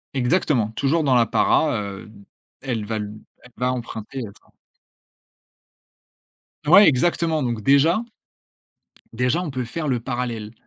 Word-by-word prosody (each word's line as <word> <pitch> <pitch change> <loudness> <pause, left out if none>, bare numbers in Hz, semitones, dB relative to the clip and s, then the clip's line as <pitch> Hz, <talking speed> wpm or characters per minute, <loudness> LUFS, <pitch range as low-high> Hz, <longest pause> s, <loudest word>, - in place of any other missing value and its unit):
Exactement, 125 - +1
toujours 145 +7 0
dans 135 -3 +2
l'apparat, 120 +2 +2
heu, 100 +1 -8 0.5
elle 120 -5 -3
va 110 +1 -3
l 105 -1 -5 0.3
elle 125 - -16
va 125 0 0
emprunter 120 0 -6
à - - -11
sa - - -29 2.2
Ouais, 195 +4 +8
exactement, 160 +3 0
donc 120 -4 -2
déjà 150 +9 +4 1.1
déjà, 125 +9 0
on 170 - -4
peut 130 -2 -4
faire 155 +6 -4
le 125 -3 0
parallèle. 120 -3 -4
125 Hz, 130 wpm, -22 LUFS, 115-150 Hz, 2.2 s, Ouais